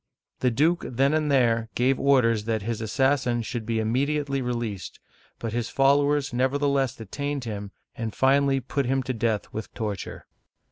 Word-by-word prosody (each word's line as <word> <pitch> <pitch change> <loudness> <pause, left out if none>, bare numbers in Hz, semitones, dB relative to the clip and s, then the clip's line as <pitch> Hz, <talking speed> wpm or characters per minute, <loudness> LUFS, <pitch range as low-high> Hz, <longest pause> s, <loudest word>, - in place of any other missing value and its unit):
The 125 - +2
duke 155 +9 +2
then 135 +4 +2
and 155 -2 +1
there 115 -4 +2
gave 130 +2 +2
orders 115 -6 +3
that 110 -2 -1
his 115 0 -3
assassin 125 +1 +1
should 115 -1 -5
be 115 -1 0
immediately 140 +5 0
released, 120 -7 -4 0.4
but 115 -2 -5
his 120 -1 -2
followers 140 +1 +3
neverthe 140 +3 +1
less 135 -3 +1
detained 140 +6 -4
him 105 -3 -5 0.3
and 115 -1 -3
finally 135 0 +3
put 135 +1 -2
him 135 +1 +1
to 130 +1 -2
death 110 -2 -1
with 110 -1 -5
torture. 105 -3 -5
125 Hz, 160 wpm, -25 LUFS, 115-140 Hz, 0.4 s, orders